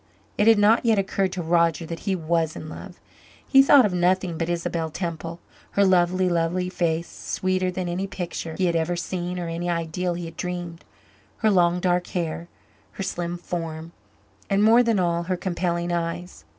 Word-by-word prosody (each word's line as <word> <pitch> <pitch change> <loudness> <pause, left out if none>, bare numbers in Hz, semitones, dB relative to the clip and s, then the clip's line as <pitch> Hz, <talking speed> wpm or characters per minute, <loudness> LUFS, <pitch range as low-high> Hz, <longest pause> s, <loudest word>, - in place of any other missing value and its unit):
It 210 - +2
had 225 -1 +7
not 210 +3 +4
yet 225 -3 +3
occurred 195 -1 0
to 180 - -3
Roger 170 0 +2
that 165 +5 -5
he 190 - +2
was 165 -1 0
in 155 - -7
love. - - -10 0.5
He 270 - +7
thought 275 -2 +7
of 200 - 0
nothing 180 0 +1
but 165 +1 -2
Isabel 170 -1 -2
Temple 170 0 -5 0.3
her 200 - +4
lovely, 185 0 +3
lovely 175 +1 0
face, 170 -2 -1
sweeter 185 0 -2
than 180 0 -3
any 180 +3 -2
picture 175 -4 -5
he 190 - +1
had 170 -1 +1
ever 165 +2 0
seen 180 0 -4
or 175 -1 -3
any 170 +1 -3
ideal 170 +1 -1
he 175 0 -5
had 165 0 -10
dreamed, 175 -2 -5 0.6
her 215 - +5
long 175 -2 +3
dark 180 0 +1
hair, 170 -1 -3 0.5
her 195 - -5
slim 175 -1 -3
form 165 -2 -5 0.6
and, 200 +1 +3
more 230 +3 +6
than 230 -4 +2
all, 170 -1 +1
her 185 +1 -1
compelling 175 -1 -2
eyes. 170 +1 -4
175 Hz, 185 wpm, -24 LUFS, 170-185 Hz, 0.6 s, had